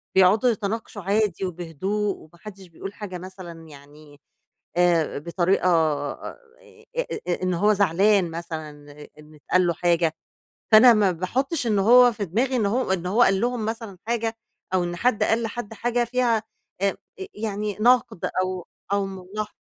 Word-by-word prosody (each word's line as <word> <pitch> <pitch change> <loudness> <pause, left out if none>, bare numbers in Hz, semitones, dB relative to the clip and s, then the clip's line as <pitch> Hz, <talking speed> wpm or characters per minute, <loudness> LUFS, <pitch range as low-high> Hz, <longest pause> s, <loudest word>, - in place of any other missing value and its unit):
بيقعدوا 200 +6 +5
يتناقشوا 215 -1 -3
عادي 200 -1 0
وبهدوء، 185 +4 -3
وما 165 +2 -18
حدش 195 -2 -11
بيقول 195 +4 -9
حاجة 190 -4 -7
مثلًا 175 -3 -10
يعني 145 0 -16 0.6
آآ، 170 -4 +2
بطريقة 175 +3 0
آآ، 155 - -1 1.0
إن 185 -1 +1
هو 205 +5 +3
زعلان 195 -1 +3
مثلًا 160 -2 -6 0.5
إن 150 0 -16
اتقال 175 +5 +1
له 170 - +1
حاجة، 170 -1 +1 0.6
فأنا 230 +2 +9
ما 205 -3 +3
باحطش 245 - -2
إن 210 -3 +2
هو 245 +4 +7
في 205 -2 -4
دماغي 245 +9 0
إن 220 -4 +1
هو 225 0 0
إن 180 -2 -1
هو 210 +7 +2
قال 195 -3 +4
لهم 240 -2 -1
مثلًا 225 -4 -5
حاجة 230 -1 -1 0.4
أو 180 -1 +2
إن 175 0 -3
حد 235 +3 +1
قال 230 +1 +1
لحد 225 -1 -5
حاجة 240 +2 0
فيها 235 -2 +1 0.4
آآ، 200 -1 +1 0.4
يعني 210 -2 -3
نقد 245 -6 +3 0.2
أو 185 -1 -4 0.3
أو 200 -1 +1
ملاح 195 +3 -6
195 Hz, 150 wpm, -24 LUFS, 175-220 Hz, 1.0 s, فأنا